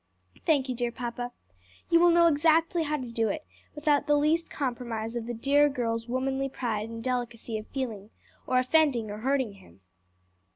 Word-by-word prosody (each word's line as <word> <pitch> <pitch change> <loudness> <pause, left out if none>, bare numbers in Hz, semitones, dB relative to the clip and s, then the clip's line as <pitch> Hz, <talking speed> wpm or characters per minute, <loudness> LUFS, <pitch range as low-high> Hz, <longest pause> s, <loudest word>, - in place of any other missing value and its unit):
"Thank 285 -5 +3
you, 255 - -1
dear 240 0 -2
papa. 245 0 -5 0.6
You 335 - +6
will 350 0 +6
know 340 0 +5
exactly 330 +2 +3
how 300 -1 0
to 250 -4 -6
do 225 -1 0
it 310 0 -4 0.3
without 295 -1 +1
the 295 0 +4
least 315 +3 +1
compromise 235 -4 -3
of 235 -1 -4
the 240 - -3
dear 285 +5 +4
girl's 230 -3 -2
womanly 265 +2 -1
pride 225 -4 -3
and 230 0 -7
delicacy 240 -2 -3
of 215 - -11
feeling, 220 -7 -5 0.4
or 255 - +2
offending 255 -4 +2
or 210 - -6
hurting 260 -2 0
him. 85 +3 -20
255 Hz, 175 wpm, -28 LUFS, 230-295 Hz, 0.6 s, You